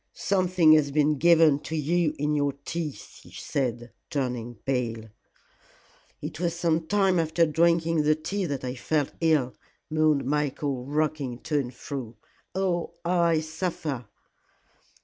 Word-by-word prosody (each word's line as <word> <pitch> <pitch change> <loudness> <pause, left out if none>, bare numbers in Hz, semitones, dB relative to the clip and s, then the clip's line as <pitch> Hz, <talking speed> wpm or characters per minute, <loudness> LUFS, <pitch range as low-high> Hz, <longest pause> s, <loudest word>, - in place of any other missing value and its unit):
"Something 185 -4 +3
has 155 -2 +5
been 150 0 +2
given 165 -3 +5
to 160 - -5
you 160 +1 +1
in 150 +1 0
your 145 -1 +1
tea," 165 -3 -2
she - - -15
said, 120 -3 -3 0.2
turning 125 -4 -3
pale. 115 -4 -2 1.1
"It 155 - -6
was 170 -1 -1
some 165 -2 0
time 195 -1 +3
after 165 +1 +2
drinking 165 +1 +2
the 150 +1 +3
tea 185 +6 -3
that 140 -3 -4
I 125 -1 -3
felt 145 +2 -1
ill," 155 -6 +2 0.4
moaned 155 -3 +2
Michael, 140 -2 -1
rocking 145 -4 -1
to 150 -2 0
and 125 -3 -3
fro. 120 -2 -7 0.4
"Oh, 180 -3 -1
how 175 - 0
I 165 -2 +3
suffer." 160 - -4
155 Hz, 140 wpm, -26 LUFS, 135-165 Hz, 1.1 s, has